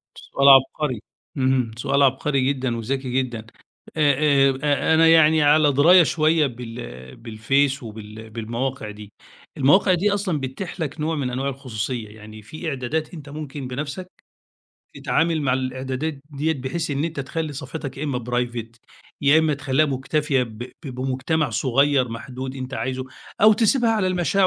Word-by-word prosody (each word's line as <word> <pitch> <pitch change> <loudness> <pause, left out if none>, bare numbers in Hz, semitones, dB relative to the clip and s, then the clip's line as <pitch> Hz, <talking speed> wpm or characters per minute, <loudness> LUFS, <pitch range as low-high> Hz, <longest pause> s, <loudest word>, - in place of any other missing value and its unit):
سؤال 140 0 0
عبقري. 135 -1 +4 0.4
إمم، 130 -3 +1
سؤال 140 +3 +1
عبقري 135 +1 +1
جدًا 130 -3 -3
وذكي 130 +3 -3
جدًا، 115 -3 -7 0.5
آآ، 145 -2 +4
آآ، 145 +2 +2
أنا 165 +1 +5
يعني 160 -1 +5
على 150 0 +5
دراية 170 +6 +7
شويّة 155 -1 +2
بال 115 - -9
بالفيس 125 +5 0
وبال 110 0 -9
بالمواقع 115 +2 -4
دي، 105 0 -12 0.4
المواقع 185 +8 +4
دي 195 +4 +1
أصلًا 195 -6 -1
بتتيح 135 +8 -6
لَك 155 -1 -4
نوع 160 +2 -1
من 140 -4 -2
أنواع 130 +3 -2
الخصوصيّة، 125 -4 -5
يعني 110 0 -12
في 155 - -6
إعدادات 150 +4 -3
أنتَ 150 -4 -10
ممكن 145 -2 -6
بنفسَك 140 +8 -5 0.9
تتعامل 165 -1 0
مع 130 -3 +1
الإعدادات 130 +3 -3
ديّة 150 +3 -1
بحيث 150 +4 -4
إن 145 +1 -1
أنتَ 160 -3 -3
تخلّي 155 +3 -4
صفحتَك 140 -1 -7
يا 150 - -3
إما 125 -5 -3
private 120 -1 -3 0.4
يا 145 +3 +5
إما 160 -2 +2
تخليها 145 +1 +1
مكتفية 140 0 0
ب 110 -3 -8 0.3
ب - - -5
بمجتمع 130 +3 -1
صغيّر 135 +3 +2
محدود 130 +3 -7
أنتَ 130 0 -6
عايزه، 130 0 -3 0.4
أو 215 +1 +7
تسيبها 230 +2 +2
على 215 -4 +1
المشاع 185 +1 +2
135 Hz, 150 wpm, -22 LUFS, 125-155 Hz, 0.9 s, دراية